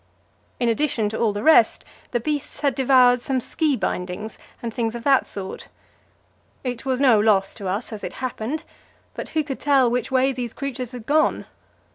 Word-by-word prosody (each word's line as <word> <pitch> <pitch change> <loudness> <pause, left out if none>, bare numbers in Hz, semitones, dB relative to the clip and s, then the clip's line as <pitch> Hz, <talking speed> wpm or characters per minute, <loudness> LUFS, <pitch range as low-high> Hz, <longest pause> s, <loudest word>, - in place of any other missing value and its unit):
In 240 - +1
addition 230 -3 +1
to 220 - -4
all 225 -2 +2
the 205 +1 -4
rest, 310 -8 +5 0.2
the 240 - 0
beasts 290 +4 -3
had 280 -2 +2
devoured 255 -2 +4
some 265 0 -1
ski 300 +3 0
bindings 190 0 -4 0.2
and 230 -2 -5
things 230 -1 -2
of 235 - -6
that 275 -1 +3
sort. 190 -1 -7 1.0
It 250 -1 -4
was 260 -1 0
no 255 -6 +5
loss 205 -2 +3
to 200 -4 -6
us, 205 +5 -3
as 210 - -8
it - - -5
happened; 255 +3 -4 0.5
but - - -6
who 310 - +3
could 275 -2 -5
tell 270 -4 +3
which 250 +1 -1
way 265 0 +3
these 245 -3 -5
creatures 255 -3 -5
had 240 -3 -8
gone? 310 +3 +2
245 Hz, 185 wpm, -23 LUFS, 220-270 Hz, 1.0 s, rest